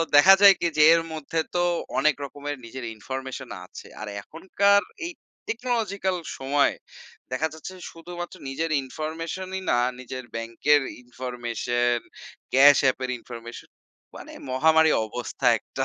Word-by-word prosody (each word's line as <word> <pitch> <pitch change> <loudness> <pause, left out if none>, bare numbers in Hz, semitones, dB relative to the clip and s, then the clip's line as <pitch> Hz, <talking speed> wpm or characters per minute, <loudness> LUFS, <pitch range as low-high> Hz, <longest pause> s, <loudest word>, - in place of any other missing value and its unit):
দেখা 185 +7 +9
যায় 200 -1 +10
কি? - - -1
যে, - - +5
এর 165 - +3
মধ্যে 160 +1 -3 0.2
তো - - +2 0.4
অনেক 155 +1 +3
রকমের 145 +1 -6
নিজের 120 +1 -7
ইনফরমেশন 130 +3 -6 0.2
আছে। - - -12
আর 110 - -5
এখনকার 200 - +2 0.2
এই 345 - -4 0.4
টেকনোলজিক্যাল 215 -6 -1 0.2
সময়, 140 +2 +2 0.6
দেখা 140 +5 0
যাচ্ছে 160 +4 -9 0.2
শুধুমাত্র 175 +2 -8
নিজের 160 +4 -2
ইনফরমেশনই 165 +7 -5
না, 120 - +3 0.2
নিজের 130 0 -7
ব্যাংকের 115 +6 +2 0.2
ইনফরমেশন, 120 -1 -2 0.5
ক্যাশ 140 +2 +8
আপ - - -20
এর 130 - -2
ইনফরমেশন, 115 0 -10 0.5
মানে - - -10 0.2
মহামারী 160 +4 +4
অবস্থা 125 +3 -5
একটা। 135 - -4
145 Hz, 130 wpm, -25 LUFS, 125-170 Hz, 0.6 s, যায়